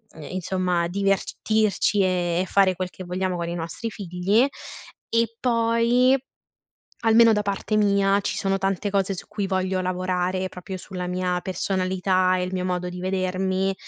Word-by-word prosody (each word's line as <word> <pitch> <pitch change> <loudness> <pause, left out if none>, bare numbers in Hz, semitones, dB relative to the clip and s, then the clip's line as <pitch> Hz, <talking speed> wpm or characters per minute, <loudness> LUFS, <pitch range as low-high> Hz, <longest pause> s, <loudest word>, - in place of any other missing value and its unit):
n 155 - -10
insomma, 180 -1 0
divertirci 200 +2 +1
e 175 -2 +1
e - - -1
fare 190 -1 +3
quel 185 0 -3
che 185 - -10
vogliamo 185 +1 -2
con 170 -1 -3
i 170 - -3
nostri 170 +7 -5
figli, 195 +4 +1 0.7
e 230 0 +1
poi, 235 +2 +3 0.8
almeno 225 0 +6
da 210 - +1
parte 200 +2 -2
mia, 200 -1 +3
ci - - -2
sono 195 0 0
tante 195 +1 -1
cose 195 -1 0
su - - -9
cui 205 -2 -3
voglio 185 0 0
lavorare, 185 0 -1
proprio 185 +1 -7
sulla 180 -1 -6
mia 180 0 -1
personalità 185 0 +1
e 180 - -1
il 185 - -4
mio 185 -1 -1
modo 180 -1 -2
di 180 0 -7
vedermi, 185 +1 0
185 Hz, 160 wpm, -24 LUFS, 180-200 Hz, 0.8 s, almeno